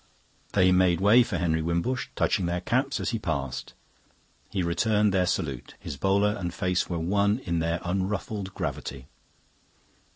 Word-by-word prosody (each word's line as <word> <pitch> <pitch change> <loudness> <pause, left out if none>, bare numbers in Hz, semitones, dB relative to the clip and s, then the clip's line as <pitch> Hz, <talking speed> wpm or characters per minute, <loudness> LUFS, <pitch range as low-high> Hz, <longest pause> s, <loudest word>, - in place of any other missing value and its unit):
They 95 -2 +5
made 90 -2 +4
way 105 +6 +6
for 120 - -1
Henry 80 -2 +1
Wimbush, 85 +10 -1
touching 90 - +1
their 85 +1 -1
caps 130 +8 0
as - - -1
he 115 - -2
passed. 70 -8 -3 0.7
He 95 -3 -1
returned 105 +4 +2
their 90 -2 +2
salute; 70 -9 -3
his - - -6
bowler 100 +6 +2
and 90 -2 -3
face 90 0 -1
were 85 - -2
one 100 +5 +2
in 85 -9 -2
their 85 +1 0
unruffled 95 +2 -2
gravity. 65 -2 -4
90 Hz, 155 wpm, -27 LUFS, 85-105 Hz, 0.7 s, way